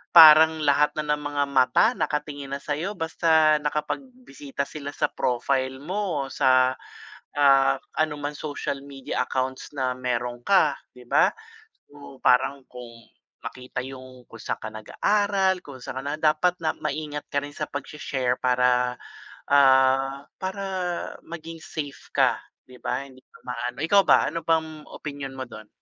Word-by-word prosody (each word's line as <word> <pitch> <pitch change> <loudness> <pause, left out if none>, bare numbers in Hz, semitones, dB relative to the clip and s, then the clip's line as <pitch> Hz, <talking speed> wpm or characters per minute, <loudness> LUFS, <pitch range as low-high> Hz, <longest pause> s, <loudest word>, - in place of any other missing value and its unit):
parang 160 -1 +9
lahat 145 0 +3
na 155 - -1
ng 150 - -10
mga 145 0 0
mata 130 +4 +4
nakatingin 145 - -3
na 140 - -3
sa'yo, 155 +8 -3
basta 160 -2 +3
nakapagbisita 150 - -4
sila 145 -2 -7
sa - - +1
profile 130 +1 -1
mo, 175 -5 -2
sa, 130 -1 +3 0.6
ah, 135 -1 +5 0.2
anumang 150 -1 -1
social 145 -2 -4
media 135 -2 -3
accounts 130 0 -3
na 130 -2 -1
meron 125 -1 -3
ka, 170 -7 +4 0.2
'di 125 -1 -15
ba? - - +5 0.6
So, 145 -1 -12
parang 130 +2 +3
kung 125 -1 -10 0.6
makita 125 0 -6
yung, 130 -1 -11
kung 115 - -13
saan - - -4
ka 110 - -4
nag-aaral, 190 - +1
kung 140 -5 -11
saan 130 - -5
ka - - -9
na, 145 - -2
dapat 155 +3 +2
na 155 - +1
maingat 150 -1 -4
ka 145 - -1
rin 145 - -8
sa 150 +1 -5
pagshe-share 135 -3 -3
para, 125 0 +2 0.5
ah, 135 0 +4
para 190 +1 -4 0.6
maging 165 0 -9
safe 145 -3 -7
ka, - - +3 0.3
di 130 - -14
ba? 140 - -2
Hindi 130 -1 -18
pa - - -20
maano 125 0 -4
ikaw 200 +4 +5
ba, - - +5
ano 165 +3 -4
bang, 160 -1 0
opinyon 140 -3 -7
mo 130 - -3
do'n? 110 -2 -11
140 Hz, 150 wpm, -25 LUFS, 130-155 Hz, 0.6 s, parang